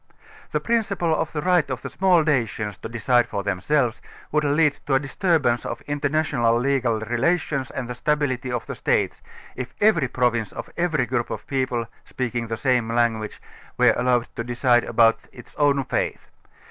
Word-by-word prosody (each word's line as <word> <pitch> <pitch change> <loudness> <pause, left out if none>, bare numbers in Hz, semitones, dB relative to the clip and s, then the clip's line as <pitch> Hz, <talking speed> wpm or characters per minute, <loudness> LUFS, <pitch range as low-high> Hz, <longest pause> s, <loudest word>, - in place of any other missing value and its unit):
The - - +1
principle 200 -8 0
of 155 0 -1
the 150 - -3
right 180 -5 +3
of 130 -1 -4
the - - -4
small 185 -3 +3
nations 115 - -1
to - - -7
decide 120 +1 +2
for 100 - -3
themselves 110 +5 0 0.3
would 150 0 +2
lead 145 0 +2
to 135 - +2
a - - +4
disturbance 145 -4 +1
of - - -5
international 145 -5 +1
legal 125 -4 +1
relations 135 +4 0
and 125 - -5
the 125 - -4
stability 130 -1 -1
of 120 -2 -3
the - - -5
states, - - 0 0.3
if 130 0 -6
every 205 -10 +4
pro 125 0 +2
vince 110 -3 -4
or - - -6
every 160 -7 +1
group 120 0 -2
of - - -6
people, 130 -3 -1 0.2
speaking 120 -2 -3
the 115 0 -3
same 125 -4 +1
language, 115 -2 0 0.4
were - - +5
allowed 125 -1 +1
to 115 - -2
decide 120 0 +2
about 115 -1 +4
its 120 - -14
own 140 -2 +3
fate. 130 - -2
130 Hz, 175 wpm, -23 LUFS, 120-150 Hz, 0.4 s, were